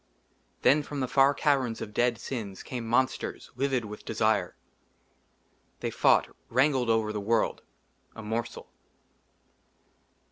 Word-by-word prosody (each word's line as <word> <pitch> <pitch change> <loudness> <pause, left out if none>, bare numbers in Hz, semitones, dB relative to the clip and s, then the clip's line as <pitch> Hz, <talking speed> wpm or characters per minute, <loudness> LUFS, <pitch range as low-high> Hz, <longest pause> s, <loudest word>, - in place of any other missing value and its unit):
THEN 150 +2 +5
FROM 145 0 -6
THE 130 - -1
FAR 135 +2 +4
CAVERNS 135 -7 +1
OF 105 - -7
DEAD 120 +1 +2
SINS 105 -8 -6
CAME 120 -3 -5
MONSTERS, 130 +3 -1
LIVID 130 -2 0
WITH 105 0 -9
DESIRE. 105 -5 0 1.3
THEY - - -2
FOUGHT, - - +3 0.2
WRANGLED 130 -1 +2
OVER 110 -1 +1
THE 105 - -3
WORLD, 110 +2 +1 0.5
A 115 - -8
MORSEL. 115 +2 -4
120 Hz, 120 wpm, -28 LUFS, 110-135 Hz, 1.3 s, THEN